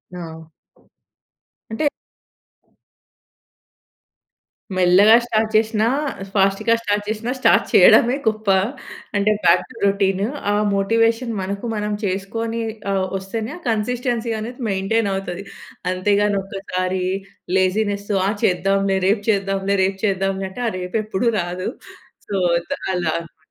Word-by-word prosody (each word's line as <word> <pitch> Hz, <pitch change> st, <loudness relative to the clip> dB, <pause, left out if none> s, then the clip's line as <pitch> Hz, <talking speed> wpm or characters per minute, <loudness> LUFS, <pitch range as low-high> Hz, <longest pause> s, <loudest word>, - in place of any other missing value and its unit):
ఆ! 160 Hz, -2 st, -9 dB, 1.2 s
అంటే 260 Hz, +7 st, -1 dB, 2.9 s
మెల్లగా 185 Hz, +5 st, +6 dB
స్టార్ట్ 220 Hz, -2 st, 0 dB
చేసినా, 220 Hz, 0 st, +2 dB, 0.5 s
ఫాస్ట్‌గా 195 Hz, +3 st, +2 dB
స్టార్ట్ 205 Hz, -2 st, 0 dB
చేసినా 220 Hz, +3 st, -2 dB
స్టార్ట్ -, -, +4 dB
చేయడమే 245 Hz, +2 st, +6 dB
గొప్ప. 215 Hz, -1 st, -1 dB, 0.7 s
అంటే, 205 Hz, +1 st, +3 dB
బ్యాక్ 170 Hz, +2 st, +5 dB
టు -, -, -14 dB
రొటీన్. 195 Hz, -1 st, +1 dB, 0.3 s
ఆ -, -, +2 dB, 0.2 s
మోటివేషన్ 230 Hz, +4 st, +1 dB
మనకు 200 Hz, +3 st, -4 dB
మనం 210 Hz, 0 st, -2 dB
చేసుకొని 225 Hz, +5 st, -2 dB, 0.3 s
ఆహ్, 190 Hz, -1 st, 0 dB
వస్తేనే, 215 Hz, +5 st, -5 dB
ఆ -, -, -12 dB
కన్సిస్టెన్సీ 235 Hz, +1 st, -1 dB
అనేది, 245 Hz, +4 st, -7 dB
మెయింటైన్ 200 Hz, +2 st, 0 dB
అవుతది. 195 Hz, 0 st, -4 dB, 0.5 s
అంతేగాని, 200 Hz, +2 st, +1 dB
ఒక్కసారి 185 Hz, -1 st, -3 dB, 0.5 s
లేజీనెస్ 200 Hz, +2 st, 0 dB, 0.2 s
ఆ -, -, +2 dB
చేద్దాంలే, 195 Hz, +1 st, +2 dB
రేపు 205 Hz, 0 st, +1 dB
చేద్దాంలే, 195 Hz, -1 st, +1 dB
రేపు 190 Hz, 0 st, -1 dB
చేద్దాంలే 195 Hz, -1 st, -1 dB
అంటే, 245 Hz, -, -7 dB
ఆ -, -, -5 dB
రేపు 180 Hz, +3 st, -6 dB
ఎప్పుడూ 210 Hz, +1 st, -2 dB, 0.2 s
రాదు. 180 Hz, +2 st, -4 dB, 0.6 s
సో, 200 Hz, -, -3 dB, 0.3 s
ఇంక 280 Hz, -, -5 dB, 0.2 s
అలా 175 Hz, -3 st, 0 dB
అనమాట. 165 Hz, -1 st, -13 dB
200 Hz, 115 wpm, -21 LUFS, 190-220 Hz, 2.9 s, మెల్లగా